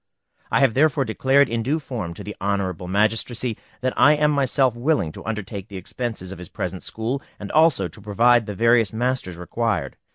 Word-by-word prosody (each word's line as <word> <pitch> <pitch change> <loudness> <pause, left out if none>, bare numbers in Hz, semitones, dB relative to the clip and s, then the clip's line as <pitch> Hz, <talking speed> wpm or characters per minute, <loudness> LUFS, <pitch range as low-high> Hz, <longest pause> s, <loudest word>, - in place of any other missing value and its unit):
I - - +2
have 135 -5 +4
therefore 140 0 +3
declared 135 +5 +3
in 115 -1 -2
due 140 +7 0
form 115 - -5
to - - -8
the 105 - -7
Honorable 95 -3 -2
Magistracy 110 +4 0 0.3
that 130 0 0
I 145 - +6
am 150 0 +2
myself 135 -2 +2
willing 120 - 0
to - - -10
undertake 105 -2 -5
the 100 - -8
expenses 95 0 -5
of 95 - -8
his 90 - -8
present 90 0 -4
school, 120 +5 -3 0.2
and 100 - -6
also 155 - +4
to 105 - -14
provide 115 +3 +3
the 105 - -5
various 115 -1 +3
masters 120 -6 -2
required. 110 +6 -2
115 Hz, 190 wpm, -23 LUFS, 100-130 Hz, 0.3 s, I